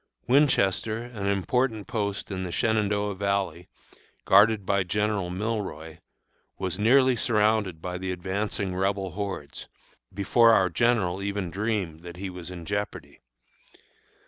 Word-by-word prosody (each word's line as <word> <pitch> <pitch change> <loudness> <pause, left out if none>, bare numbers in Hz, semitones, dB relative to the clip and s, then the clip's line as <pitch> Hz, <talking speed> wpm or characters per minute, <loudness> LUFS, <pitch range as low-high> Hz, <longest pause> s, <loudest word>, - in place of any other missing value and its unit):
Winchester, 115 -5 +2
an 115 -5 -5
important 110 +3 0
post 105 -4 -3
in 95 -1 -3
the 90 - -4
Shenandoah 105 0 0
Valley, 100 -2 -2 0.6
guarded 105 -1 +5
by 100 0 +2
General 105 0 -1
Milroy, 90 -6 -4 0.6
was 95 -1 -3
nearly 130 +4 +5
surrounded 105 -7 +1
by 90 0 -4
the 95 0 -3
advancing 95 +2 -3
Rebel 95 0 -1
hordes, 95 -6 -5 0.4
before 115 +4 +4
our 95 -4 +3
general 100 -2 +1
even 100 -3 -3
dreamed 100 -4 -2
that 85 +1 -10
he 95 0 -5
was 90 -1 -8
in 85 -2 -8
jeopardy. 100 +2 -4
100 Hz, 125 wpm, -26 LUFS, 90-110 Hz, 0.6 s, guarded